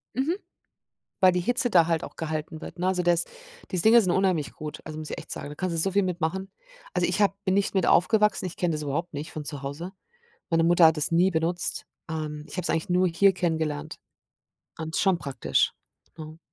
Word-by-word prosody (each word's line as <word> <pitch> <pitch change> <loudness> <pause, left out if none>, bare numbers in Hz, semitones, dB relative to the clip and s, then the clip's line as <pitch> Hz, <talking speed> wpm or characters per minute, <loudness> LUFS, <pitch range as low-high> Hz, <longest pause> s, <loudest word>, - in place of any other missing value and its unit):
Mhm. 280 +7 0 0.9
Weil 185 -2 +6
die 180 - 0
Hitze 245 +5 0
da 170 -5 +5
halt 165 -2 0
auch - - -10
gehalten 155 0 -4
wird, 170 - -9
ne? 180 - -1
Also, 180 -1 +1
der 175 0 +4
ist 170 - 0 0.4
diese 180 -3 0
Dinger 230 +2 +7
sind 185 -5 0
unheimlich 180 -5 +1
gut. 155 -1 -7
Also, 155 -1 -7
muss 155 -1 -7
ich - - -4
echt - - -10
sagen. - - -5
Da - - -7
kannst 175 +2 -3
du 160 - +2
so 195 +2 +2
viel 200 0 +3
mit 180 -1 -3
machen. 190 +5 -2 0.4
Also, - - +2
ich - - -1
habe 200 -1 +3
bin 185 - +1
nicht 200 0 +1
mit 190 - +2
aufgewachsen. 210 +3 +3
Ich 180 - -7
kenne 175 -2 0
das 150 -1 -3
überhaupt 150 +4 -3
nicht 145 +2 -5
von 155 - -6
zu 145 -2 -5
Hause. 160 +7 -6 0.6
Meine 165 -1 +3
Mutter 170 0 +6
hat 160 0 +3
das 150 - +3
nie 175 +3 +4
benutzt. 170 +2 0 0.2
Ähm, 150 -1 -4
ich - - -10
habe 180 - -1
es - - 0
eigentlich 165 -1 -1
nur 180 0 +3
hier 195 +4 +4
kennengelernt. 160 -4 -2 0.8
Und 160 0 -5
es - - +1
ist - - +2
schon 190 -3 +3
praktisch, 135 - 0 0.5
ne? 155 0 -9
170 Hz, 235 wpm, -26 LUFS, 155-185 Hz, 0.9 s, Dinger